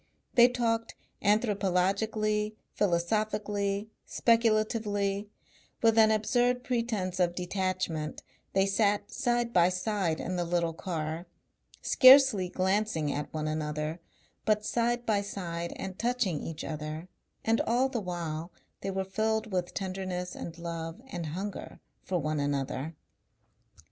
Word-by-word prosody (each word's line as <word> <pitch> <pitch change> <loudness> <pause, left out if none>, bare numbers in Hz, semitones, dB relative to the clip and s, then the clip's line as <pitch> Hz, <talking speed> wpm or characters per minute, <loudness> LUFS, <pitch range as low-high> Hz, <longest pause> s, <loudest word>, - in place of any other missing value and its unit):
They 240 -1 +8
talked 230 -2 -1 0.3
anthropologically, 210 +1 +1 0.2
philosophically, 205 +2 0 0.2
speculatively, 215 -3 +1 0.5
with 225 -1 +5
an 220 -1 +6
absurd 245 +3 +2
pretence 220 -7 -1
of 175 -1 +2
detachment, 180 -4 -2 0.3
they 195 0 +4
sat 205 +1 +1
side 240 -1 0
by 175 0 +5
side 185 -3 -1
in 180 +1 -3
the 175 - +1
little 170 -1 0
car, 165 0 -4 0.6
scarcely 255 -8 +7
glancing 190 -5 0
at 145 0 -4
one 155 -1 -2
another, 155 +1 -2 0.4
but 215 -1 +1
side 240 +1 0
by 210 -3 +2
side 170 -4 -4
and 190 -1 -6
touching 235 - 0
each 160 -1 -5
other, 155 +2 -5 0.4
and 225 0 +3
all 245 +3 +3
the 250 -4 -3
while 170 -2 -4 0.3
they 195 - -4
were 190 0 -1
filled 220 +2 -1
with 180 -1 -1
tenderness 185 -2 -3
and 170 0 -7
love 165 0 -5
and 175 -4 -4
hunger 190 +6 -5 0.2
for 185 - -2
one 155 -1 -1
another. 145 +2 -2
195 Hz, 125 wpm, -30 LUFS, 170-220 Hz, 0.6 s, They